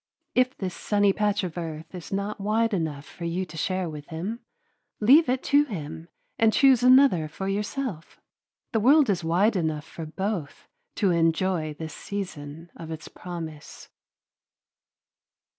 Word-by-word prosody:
If 255 +1 +2
this 185 -3 -3
sunny 205 -1 +2
patch 210 0 0
of 175 -1 -4
earth 160 0 -6
is 180 -2 -8
not 200 +1 -3
wide 220 +2 +1
enough 155 -6 -2
for 170 +3 -8
you 175 +3 -1
to 165 - -12
share 185 +3 -1
with 150 -2 -8
him, 185 +8 -4 0.6
leave 265 +7 +6
it 255 +1 0
to 290 +1 +6
him 165 - -7 0.3
and 225 -1 +5
choose 265 0 +5
another 255 - +6
for 190 +5 -6
yourself. 205 - -3 0.5
The 225 - +1
world 275 +2 +5
is 175 -3 -2
wide 185 +7 +2
enough 160 -4 -1
for 160 -1 -8
both 190 -2 -4 0.3
to 195 -4 +2
enjoy 165 -1 +1
this 160 +1 -7
season 170 -5 -6
of 165 - -9
its 160 -1 -7
promise. 165 -4 -8
185 Hz, 150 wpm, -26 LUFS, 160-215 Hz, 0.6 s, leave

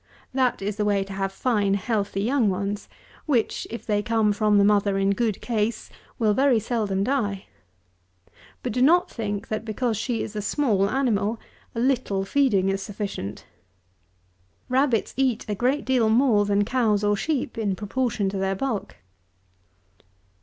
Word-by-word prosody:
That 255 -6 +1
is 205 +1 -3
the 210 - 0
way 200 -1 +2
to 195 0 -9
have 195 0 -2
fine 205 -2 +1
healthy 200 -1 -1
young 240 -2 +2
ones, 200 +2 -3 0.4
which, 245 -7 0
if 230 - -7
they 205 -2 +1
come 220 -2 +2
from 210 0 +2
the 200 - +5
mother 200 -1 +3
in 195 0 +2
good 215 0 -1
case, 225 -1 -2 0.3
will 215 -3 +2
very 265 0 +3
seldom 205 -4 -1
die. 205 -6 -1 1.2
But - - -2
do 250 - 0
not 350 +7 +4
think, 205 -2 -4
that 215 0 -2
because 225 0 -1
she 230 +1 -2
is 215 - -7
a 210 - -2
small 205 -4 +1
animal, 225 -4 0 0.4
a - - -2
little 235 -6 0
feeding 205 -6 +2
is 195 0 -1
sufficient! 195 - -5 1.2
Rabbits 255 -3 +1
eat 260 -4 +1
a 210 - -1
great 255 +7 0
deal 250 -4 +2
more 225 -3 +4
than 205 0 +2
cows 220 -4 +1
or 205 0 +3
sheep 270 +2 -2
in 205 -4 -1
proportion 215 0 -1
to 195 - -4
their 195 0 0
bulk. 225 -1 -3
215 Hz, 160 wpm, -24 LUFS, 200-245 Hz, 1.2 s, the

